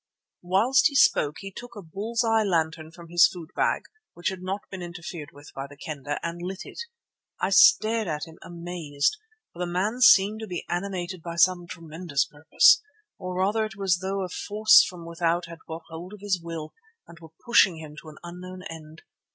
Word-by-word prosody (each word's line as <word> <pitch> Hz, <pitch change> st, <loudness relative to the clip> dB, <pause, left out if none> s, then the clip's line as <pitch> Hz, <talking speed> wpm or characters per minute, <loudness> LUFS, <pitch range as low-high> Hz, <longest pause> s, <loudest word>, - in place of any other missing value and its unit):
"Whilst 215 Hz, +9 st, +3 dB
he 285 Hz, -, -7 dB
spoke 150 Hz, -, +4 dB
he 195 Hz, 0 st, -7 dB
took 245 Hz, +5 st, -10 dB
a 205 Hz, -, -7 dB
bull's 215 Hz, +8 st, -2 dB
eye 225 Hz, -1 st, +3 dB
lantern 160 Hz, -5 st, -1 dB
from 170 Hz, 0 st, -14 dB
his 175 Hz, 0 st, +6 dB
foodbag, 170 Hz, -3 st, -2 dB, 0.3 s
which 175 Hz, -, -1 dB
had 190 Hz, -1 st, -7 dB
not 190 Hz, +2 st, -3 dB
been 190 Hz, -2 st, -6 dB
interfered 170 Hz, -3 st, -7 dB
with 145 Hz, +1 st, -14 dB
by 135 Hz, +1 st, -6 dB
the 145 Hz, 0 st, -15 dB
Kendah, 145 Hz, -1 st, -5 dB
and 170 Hz, +1 st, -4 dB
lit 185 Hz, +2 st, -5 dB
it. -, -, -11 dB, 0.6 s
I 190 Hz, -, 0 dB
stared 220 Hz, +2 st, +5 dB
at 150 Hz, -2 st, -3 dB
him 160 Hz, -1 st, -15 dB
amazed, 170 Hz, -, -2 dB, 0.4 s
for 175 Hz, -, -14 dB
the 175 Hz, -1 st, -2 dB
man 205 Hz, +7 st, -1 dB
seemed 210 Hz, -3 st, +6 dB
to 220 Hz, -, -6 dB
be 180 Hz, -3 st, -5 dB
animated 180 Hz, -1 st, -3 dB
by 170 Hz, 0 st, -6 dB
some 175 Hz, 0 st, +3 dB
tremendous 165 Hz, -3 st, -3 dB
purpose. 145 Hz, +2 st, +4 dB, 0.4 s
Or 185 Hz, -1 st, -5 dB
rather 200 Hz, +4 st, +1 dB
it 215 Hz, -2 st, -5 dB
was 195 Hz, -3 st, +1 dB
as -, -, -13 dB
though 195 Hz, +1 st, -2 dB
a 185 Hz, -, -4 dB
force 215 Hz, -, +5 dB
from 175 Hz, -, -7 dB
without 170 Hz, +1 st, -1 dB
had 165 Hz, -1 st, -11 dB
got 160 Hz, +1 st, -7 dB
hold 170 Hz, +4 st, -8 dB
of 210 Hz, -, -12 dB
his 195 Hz, -4 st, -1 dB
will 165 Hz, -2 st, -7 dB, 0.3 s
and 170 Hz, -, -14 dB
were 160 Hz, -1 st, -13 dB, 0.2 s
pushing 210 Hz, -8 st, +5 dB
him 155 Hz, -2 st, -9 dB
on 150 Hz, -, -15 dB
to 155 Hz, -, -10 dB
an 155 Hz, -, -14 dB
unknown 180 Hz, +1 st, -9 dB
end. 160 Hz, 0 st, -11 dB
175 Hz, 200 wpm, -26 LUFS, 165-195 Hz, 0.6 s, his